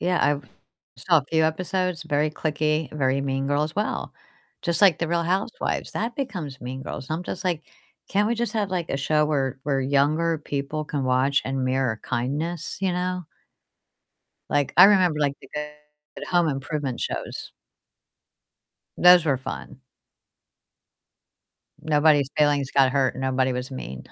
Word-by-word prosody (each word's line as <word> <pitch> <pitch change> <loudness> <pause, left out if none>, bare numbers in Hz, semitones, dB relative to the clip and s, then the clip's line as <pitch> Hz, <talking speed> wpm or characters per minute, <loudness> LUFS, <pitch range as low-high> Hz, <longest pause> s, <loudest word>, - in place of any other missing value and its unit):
yeah, 180 0 +1
I've 145 -3 0 0.5
saw 165 +6 +3
a 140 - -5
few 160 -1 +3
episodes, 180 +1 -1
very 150 -1 +1
cliquey, 155 0 -1
very 135 -2 +1
mean 135 0 -1
girl 145 +1 +1
as 155 +5 -7
well, 210 - -2 0.5
just 170 -1 0
like 190 -6 +6
The 170 - -1
Real 170 0 +1
Housewives, 190 - -2
that 230 +1 -3
becomes 180 - -4
mean 130 +2 -6
girls, 130 - -7
and 155 - 0
I'm - - -6
just 180 - -6
like, 170 -4 0 0.5
"Can't 205 +1 +2
we 235 - +1
just 235 0 -2
have, 205 -3 0
like, 175 -3 -2
a - - 0
show 150 +2 +2
where 135 -4 -1
where 135 -1 0
younger 150 +5 +2
people 145 +1 -4
can 145 -3 -2
watch 130 +2 +2
and 135 0 -2
mirror 130 -4 0
kindness, 145 +7 -3
you 190 -2 +1
know?" 180 0 -2 1.3
Like, 145 -2 +1
I 180 - +10
remember, 185 -6 +4
like, 140 -1 +1
the - - -13
good 150 0 -9
home 175 -2 +2
improvement 135 -2 -3
shows. - - -5 1.5
Those 180 -1 +7
were 145 -4 +2
fun. 130 +1 -7 2.0
Nobody's 150 -2 +3
feelings 145 -2 +2
got 135 -1 +4
hurt, 135 -2 +1
nobody 130 0 0
was 125 +1 -4
mean. 65 - -7
150 Hz, 155 wpm, -24 LUFS, 135-170 Hz, 2.0 s, I